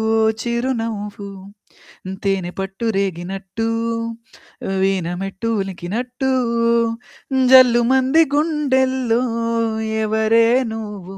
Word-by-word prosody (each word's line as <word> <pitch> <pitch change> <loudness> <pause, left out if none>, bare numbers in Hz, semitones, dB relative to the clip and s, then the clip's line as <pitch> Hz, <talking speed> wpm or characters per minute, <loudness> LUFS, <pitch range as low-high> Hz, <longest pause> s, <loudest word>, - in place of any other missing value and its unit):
ఓ - - +3 0.2
చిరునవ్వు. 225 -4 -3 0.8
హ్మ్, 190 +1 -6
తేనె 195 -3 -1
పట్టు 195 +4 -4
రేగినట్టు, 195 +3 -3 1.1
వీణ 190 -3 0
మెట్టు 195 +3 -4
ఉలికినట్టు 230 +8 -3 1.2
జల్లుమంది 260 +3 +5
గుండెల్లో 265 -5 +1 0.8
ఎవరే 220 +1 +3 0.2
నువ్వు, 205 -4 -7
225 Hz, 70 wpm, -20 LUFS, 195-250 Hz, 1.2 s, జల్లుమంది